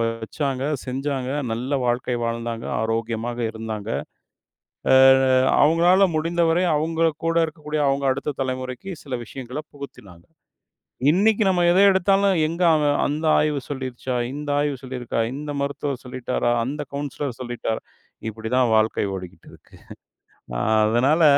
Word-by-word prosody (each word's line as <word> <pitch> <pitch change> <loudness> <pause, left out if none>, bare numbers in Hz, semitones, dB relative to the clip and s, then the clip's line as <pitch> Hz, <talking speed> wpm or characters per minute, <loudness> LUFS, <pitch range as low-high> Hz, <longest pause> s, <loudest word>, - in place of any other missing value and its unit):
வ 115 - +2 0.2
வச்சாங்க, 135 +3 -3 0.2
செஞ்சாங்க, 130 0 -3 0.2
நல்ல 125 +5 -2
வாழ்க்கை 120 0 0
வாழ்ந்தாங்க, 115 0 -3
ஆரோக்கியமாக 115 +1 -2
இருந்தாங்க. 110 -1 -6 1.0
அ - - +7 0.7
அவுங்களால 175 +5 +5
முடிந்தவரை 170 +2 +1
அவுங்க 160 +2 +1 0.2
கூட 165 0 +1
இருக்கக்கூடிய 150 -1 -4
அவுங்க 140 0 0
அடுத்த 140 +2 -4
தலைமுறைக்கு 130 +6 -5
சில 135 -3 -4
விஷயங்களப் 135 +5 -8
புகுத்தினாங்க. 100 -11 -12 0.8
இன்னைக்கு 210 +4 +3
நம்ம 180 -2 +2
எத 185 - +4
எடுத்தாலும், 195 +1 +3
"எங்க 170 +3 -4
அவன் 145 -2 +2
அந்த 150 +3 -2
ஆய்வு 150 -2 +1
சொல்லிடுச்சா? 130 -2 -4 0.2
இந்த 145 0 -6
ஆய்வு 145 -1 0
சொல்லிருக்கா? 125 -3 -4 0.2
இந்த 145 +1 -5
மருத்துவர் 140 -1 -3
சொல்லிட்டாரா? 125 -1 -1
அந்தக் 145 +3 -5
கவுன்சிலர் 140 -2 -4
சொல்லிட்டாரா?" 120 -2 -3 0.5
இப்படிதான் 115 +2 0
வாழ்க்கை 110 0 +2
ஓடிக்கிட்டுருக்கு. 95 -1 -11 0.8
அ - - -2 0.3
அதனால 135 +9 +3
135 Hz, 120 wpm, -23 LUFS, 120-155 Hz, 1.0 s, அ